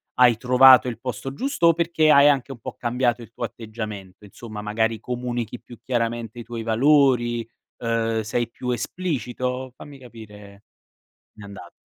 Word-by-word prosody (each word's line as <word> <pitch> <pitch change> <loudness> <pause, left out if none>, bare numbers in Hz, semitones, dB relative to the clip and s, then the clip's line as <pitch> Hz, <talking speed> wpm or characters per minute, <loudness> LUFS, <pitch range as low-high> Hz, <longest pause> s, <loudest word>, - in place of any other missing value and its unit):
hai 125 -2 +5
trovato 125 +1 +6
il 120 - -5
posto 130 +1 -5
giusto? 260 - 0
O 165 - +6
perché 165 -2 +1
hai 140 -1 +7
anche 140 -2 +1
un 120 - -15
po' - - -7
cambiato 120 0 -1
il 115 -1 -12
tuo 120 - -8
atteggiamento 110 -4 -8
insomma, 105 +1 -9
magari 110 +1 -1
comunichi 120 -1 -4
più 120 - -14
chiaramente 120 -2 -3
i 120 - -7
tuoi 115 0 -6
valori, 120 -1 +2 0.3
uhm, 115 -1 0
sei 115 +2 -2
più 125 +1 -5
esplicito? 125 -2 -3
Fammi 140 +1 -12
capire. 105 -4 -13 0.7
Mi 105 - -12
anda 100 -1 -11
120 Hz, 155 wpm, -23 LUFS, 115-130 Hz, 0.7 s, hai